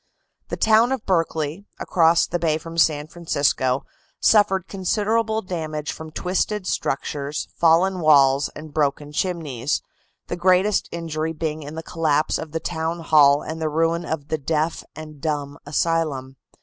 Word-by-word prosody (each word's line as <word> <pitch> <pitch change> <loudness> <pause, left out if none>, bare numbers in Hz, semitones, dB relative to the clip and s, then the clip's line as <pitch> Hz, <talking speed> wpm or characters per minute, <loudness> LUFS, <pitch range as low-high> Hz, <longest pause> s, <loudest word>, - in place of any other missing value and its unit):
The - - -4
town 225 +3 +4
of 265 -4 -2
Berkeley, 165 0 -1
across 165 -1 +3
the 175 - -3
bay 155 -2 +1
from 165 +1 -9
San 155 -3 +2
Francisco, 140 -5 0 0.3
suffered 195 -4 +3
considerable 220 +3 0
damage 155 -4 -4
from 160 0 -8
twisted 185 +5 -2
structures, 145 -2 -3
fallen 175 +3 +3
walls 140 -3 +4
and 155 -1 -10
broken 145 -1 -1
chimneys, 150 -6 -2 0.4
the - - -4
greatest 185 +3 +2
injury 160 -1 -3
being 155 -1 -3
in 150 +1 -8
the 160 - -6
collapse 155 -3 0
of 160 - -7
the 165 - -2
town 165 0 -3
hall 145 -3 +5
and 160 +1 -6
the 155 - 0
ruin 165 +2 +1
of 155 -3 -4
the 155 - -1
deaf 155 +3 -1
and 155 -2 -10
dumb 145 -3 -3
asylum. 145 -4 -1
160 Hz, 150 wpm, -22 LUFS, 150-175 Hz, 0.4 s, hall